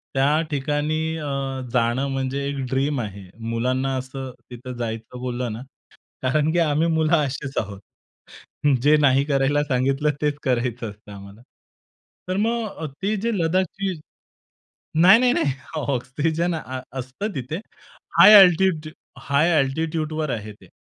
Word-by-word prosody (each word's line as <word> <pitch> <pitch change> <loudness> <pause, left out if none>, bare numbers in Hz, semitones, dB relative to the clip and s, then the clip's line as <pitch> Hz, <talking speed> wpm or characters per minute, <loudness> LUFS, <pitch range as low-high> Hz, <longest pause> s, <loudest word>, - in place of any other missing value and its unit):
त्या 145 +4 +3
ठिकाणी 145 +2 -1 0.2
अ, 150 -2 -5 0.5
जाणं 125 +2 +1
म्हणजे 135 +1 -2
एक 140 0 -3
ड्रीम 135 +1 0
आहे. 100 -3 -7 0.3
मुलांना 130 +3 0
असं 130 0 -6 0.2
तिथं 125 +1 -8
जायचं 115 +1 -5
बोललं 125 -2 -3
ना, 115 - -7 0.6
कारण, 150 +4 +2
की 175 - +2
आम्ही 155 0 +2
मुलं 160 0 +1
अशीच 135 -1 -3
आहोत. 100 -2 -6 1.0
जे 150 +1 +6
नाही 140 -2 +4
करायला 145 0 +2
सांगितलं, 135 +2 +1
तेच 150 -1 0
करायचं 125 -2 -1
असतं 105 0 -16
आम्हाला. 100 +3 -12 0.9
तर 185 - 0
मग 230 +1 0 0.2
अ, - - -1 0.2
ते 210 +2 +1
जे 230 +4 -1
लद्दाखची 185 +3 0 1.1
नाही, 190 +5 +8
नाही, 250 -1 +4
नाही, 140 - +1 0.3
ऑक्सिजन 150 +5 -1
अ, 130 -4 -6 0.2
असतं 160 - -5
तिथे. 135 +7 -4 0.6
हाय 210 - +10
अल्टिट्यूड 175 -3 +2 0.3
हाय 145 +5 +2
अल्टिट्यूडवर 155 +2 -1
आहे 110 -3 -4
ते. 105 - -19
140 Hz, 135 wpm, -23 LUFS, 125-160 Hz, 1.1 s, हाय